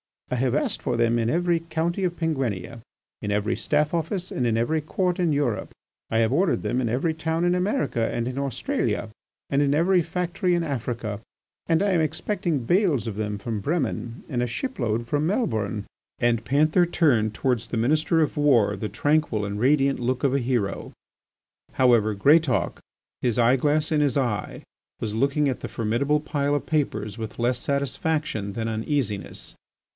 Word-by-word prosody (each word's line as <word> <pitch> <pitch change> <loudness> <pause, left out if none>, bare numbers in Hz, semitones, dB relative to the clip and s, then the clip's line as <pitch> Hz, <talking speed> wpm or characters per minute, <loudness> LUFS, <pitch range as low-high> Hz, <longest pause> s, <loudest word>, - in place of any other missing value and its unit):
"I - - +1
have 125 +1 +1
asked 150 - -1
for 120 - -1
them 115 0 +2
in 115 0 +1
every 175 +3 +2
county 165 +3 -2
of 175 -1 -1
Penguinia, 130 - -2 0.4
in 105 - -2
every 105 +2 0
Staff 150 +1 0
Office 175 +3 -2
and 125 - 0
in 115 -1 +1
every 135 +8 +1
Court 180 +4 -1
in 170 -4 +2
Europe. 140 -7 -1 0.4
I 115 - +1
have 110 -1 +2
ordered 185 -1 +1
them 125 - 0
in 120 - 0
every 135 +8 0
town 160 +1 -1
in 175 0 +3
America 180 - 0
and 120 0 -2
in 130 +2 -3
Australia, 135 -4 -1 0.4
and 140 0 +2
in 140 -1 +2
every 175 +3 +3
factory 180 +2 -1
in 170 - 0
Africa, 120 -7 -3 0.5
and 165 +2 +3
I 205 - +2
am 175 -3 +3
expecting 160 - -1
bales 170 - +2
of 105 -3 -4
them 105 -1 -2
from 110 +1 -4
Bremen 125 - -2
and 125 -5 -2
a 125 - 0
ship 255 - -4
load 115 -1 0
from 145 +6 0
Melbourne." 110 - -1 0.3
And 115 -1 +1
Panther 155 - +3
turned 120 -12 +2
towards 125 -3 0
the 120 - -3
Minister 155 +7 +2
of 155 - 0
War 120 -9 +4
the 105 +2 -4
tranquil 145 -2 +1
and 100 +1 -4
radiant 135 +2 +3
look 125 +1 -1
of 135 -2 +2
a 140 - +2
hero. 120 -6 -2 0.8
However, 115 -5 +3
Greatauk, 145 +5 +3 0.4
his 120 -2 0
eye 120 +2 +4
glass 150 +3 +1
in 150 -1 +3
his 140 -3 +2
eye, 120 -8 -2 0.4
was 105 -2 -2
looking 140 +5 +1
at 130 - -2
the - - -5
formidable 130 +7 0
pile 145 -1 0
of 145 - -2
papers 110 -9 -1
with 110 -1 -6
less 120 +1 +1
satisfaction 140 -5 -1
than 115 +1 -3
uneasiness. 110 - -3
135 Hz, 180 wpm, -25 LUFS, 115-160 Hz, 0.8 s, War